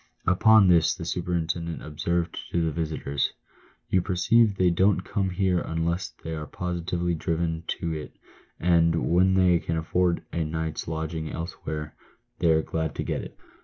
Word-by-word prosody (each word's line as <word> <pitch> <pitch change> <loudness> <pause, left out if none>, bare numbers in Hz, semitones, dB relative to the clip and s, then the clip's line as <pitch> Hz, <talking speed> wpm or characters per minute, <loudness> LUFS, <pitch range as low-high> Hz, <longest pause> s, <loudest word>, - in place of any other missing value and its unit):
Upon 105 +3 +6
this 85 -3 +4
the 90 -3 -7
superintendent 85 -1 -2
observed 85 +3 -2
to 85 -1 0
the 80 - 0
visitors: 75 -3 -2 0.6
"You 95 - +4
perceive 105 +3 +3
they 90 -1 +4
don't 95 +2 +3
come 100 0 -1
here 90 -1 +1
unless 85 +2 -2
they 80 - -4
are 75 -1 -5
positively 85 0 -2
driven 80 0 -2
to 85 -1 -2
it, 75 -1 -7 0.4
and 85 -1 +3 0.2
when 95 +2 +4
they 90 -2 +4
can 80 0 -2
afford 85 +2 0
a 85 - 0
night's 80 0 -3
lodging 80 0 -3
elsewhere 75 -2 -5 0.5
they 85 - +3
are 80 0 +4
glad 80 -2 -3
to - - -2
get - - -2
it." - - -10
85 Hz, 160 wpm, -26 LUFS, 80-90 Hz, 0.6 s, Upon